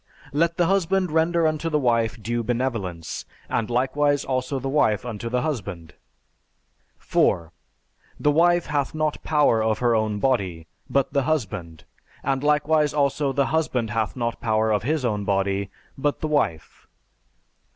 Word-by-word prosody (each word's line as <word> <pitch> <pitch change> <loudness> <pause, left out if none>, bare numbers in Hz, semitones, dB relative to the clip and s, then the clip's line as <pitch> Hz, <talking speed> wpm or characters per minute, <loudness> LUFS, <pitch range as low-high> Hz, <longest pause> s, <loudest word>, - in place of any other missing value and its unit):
Let 170 +3 +1
the 175 - +3
husband 190 -1 +1
render 165 +1 +2
unto 155 +1 0
the 155 - +1
wife 115 -5 +1
due 120 +2 -2
benevolence; 115 -9 -3 0.2
and 115 0 -1
likewise 140 +4 +1
also 130 +1 -1
the 135 +1 -4
wife 125 -5 +2
unto 115 -1 -5
the 125 +1 0
husband. 95 - -4 1.0
4. 85 -1 +1 0.7
The 150 - +3
wife 175 +3 +3
hath 145 0 -1
not 155 -1 -1
power 150 -7 +3
of 110 0 +1
her 120 -1 +2
own 110 -1 0
body, 95 -10 0 0.2
but 140 0 +1
the 140 - +3
husband; 105 - -3 0.4
and 135 0 -1
likewise 150 0 +2
also 140 0 +1
the 140 +1 +1
husband 125 -8 0
hath 110 0 -1
not 115 -2 -3
power 110 -1 +1
of 105 - +2
his 150 +2 -1
own 105 -3 -1
body, 100 0 0 0.3
but 145 +1 -1
the 155 - -2
wife. 115 - -2
130 Hz, 150 wpm, -24 LUFS, 110-150 Hz, 1.0 s, the